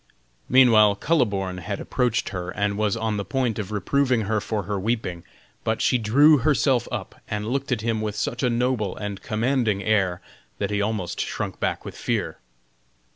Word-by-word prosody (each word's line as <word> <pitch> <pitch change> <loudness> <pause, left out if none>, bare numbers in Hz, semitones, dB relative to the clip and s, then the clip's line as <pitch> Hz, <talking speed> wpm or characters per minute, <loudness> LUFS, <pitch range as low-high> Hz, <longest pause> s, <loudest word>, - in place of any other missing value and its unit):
Meanwhile 110 -5 +6
Kuhleborn 100 - 0
had 85 - -4
approached 120 -2 0
her, 90 -3 -5
and 100 +2 -1
was 105 +1 0
on 110 -1 -1
the 100 - -2
point 120 +1 -1
of 105 -1 -4
reproving 125 +4 +1
her 110 0 0
for 105 -1 -2
her 100 +1 -3
weeping. 95 -5 -2 0.4
But - - 0
she 125 - +2
drew 140 +7 +5
herself 130 -2 +2
up, - - -6
and 105 0 -3
looked 135 +4 -2
at 120 -4 0
him 110 -1 -1
with 105 -1 -3
such 120 +3 -2
a 125 - +2
noble 120 -4 0
and 105 -2 -5
commanding 110 -3 0
air 95 -5 +1 0.4
that 100 0 -2
he 105 0 0
almost 105 -4 -2
shrunk - - -4
back - - -2
with - - -7
fear. - - -2
110 Hz, 180 wpm, -24 LUFS, 100-125 Hz, 0.4 s, Meanwhile